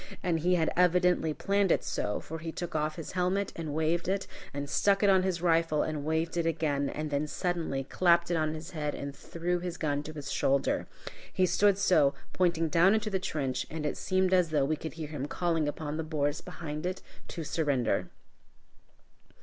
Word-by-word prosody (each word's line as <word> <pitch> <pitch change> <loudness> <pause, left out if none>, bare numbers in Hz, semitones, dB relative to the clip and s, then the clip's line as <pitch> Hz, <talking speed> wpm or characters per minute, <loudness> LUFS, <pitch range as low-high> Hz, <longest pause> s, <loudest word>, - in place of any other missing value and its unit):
And 170 -3 +1
he 180 +3 +3
had 160 -2 +1
evidently 180 -2 +3
planned 200 +3 +1
it - - +2
so, 105 - -2
for 160 +1 -7
he 165 0 -5
took 175 +1 -5
off 155 0 -1
his 165 - -6
helmet 185 +2 0
and 160 -3 -4
waved 160 +2 0
it, 195 +1 0 0.3
and 140 0 -4
stuck 195 +7 +2
it 200 - +6
on 190 -1 +5
his 185 -2 -1
rifle 165 -3 +3
and 155 -2 -3
waved 160 +2 -1
it 170 -1 +1
again, 145 -4 0
and 155 0 -4
then 145 +1 0
suddenly 165 -5 -2
clapped 170 +4 +3
it - - +2
on 155 -1 0
his 160 +3 -8
head 150 -3 -3
and 140 0 -6
threw 175 +4 -2
his 175 -1 -5
gun 145 -2 0
to 155 +1 -8
his 145 -2 -6
shoulder. 135 0 +1 0.4
He 185 - +2
stood 200 +2 +3
so, 155 -8 +4 0.2
pointing 170 -3 +2
down 175 +6 +5
into 215 -1 -1
the 190 - +1
trench, 135 -8 -2
and 155 -1 -4
it 150 - -1
seemed 185 0 +1
as 180 -3 +4
though 150 -3 +2
we 155 +3 +1
could 160 +1 -7
hear 160 -2 -6
him 145 -2 -4
calling 165 -2 0
upon 150 0 -3
the 160 - -2
Boers 150 -1 -1
behind 155 0 -5
it 185 +1 -4 0.2
to 165 - -5
surrender. 145 -5 0
160 Hz, 205 wpm, -30 LUFS, 150-180 Hz, 0.4 s, it